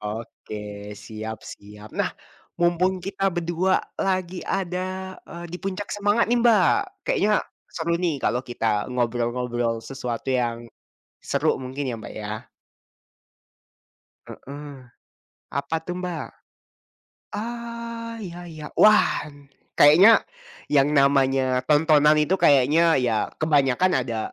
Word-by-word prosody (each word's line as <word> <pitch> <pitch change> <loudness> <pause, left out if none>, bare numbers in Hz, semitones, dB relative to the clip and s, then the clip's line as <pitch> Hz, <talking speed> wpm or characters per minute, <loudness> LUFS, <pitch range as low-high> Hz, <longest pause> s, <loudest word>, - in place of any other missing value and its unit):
Oke 105 0 -7 0.4
siap 110 +1 -7
siap. 105 +1 -12
Nah, - - 0 0.5
mumpung 175 +2 +2
kita 195 0 0
berdua 175 +1 0 0.2
lagi 185 -2 -1
ada, 185 0 -3
eee, 170 0 -8
di - - -3
puncak 195 +1 -4
semangat 205 +3 +2
nih 245 - +3
Mbak 225 -6 +5 0.3
kayaknya, 210 +1 +2 0.2
seru 170 0 -1
nih 170 -5 0
kalau 125 - +1
kita 115 -4 -1
ngobrol-ngobrol 120 -1 -1
sesuatu 130 -1 -4
yang 120 -2 -1 0.6
seru - - +1
mungkin 130 +2 -5
ya 120 - -3
Mbak 110 - -9
ya. 105 +1 -6 1.8
Heeh, 140 -2 -10 0.7
apa 140 +4 -1
tuh 180 - -3
Mbak? 170 -5 -4 1.1
Ah, 235 +1 -5
iya 175 -3 -7
iya. 155 -2 -8
Wah! 215 0 +5 0.6
Kayaknya, 175 +10 +8 0.5
yang 145 0 +4
namanya 135 -2 +3
tontonan 150 0 +5
itu 150 +5 +2
kayaknya 150 +4 +5
ya 120 -4 +1 0.2
kebanyakan 145 +2 +3 0.2
ada, 115 -2 -3
150 Hz, 110 wpm, -24 LUFS, 125-185 Hz, 1.8 s, Kayaknya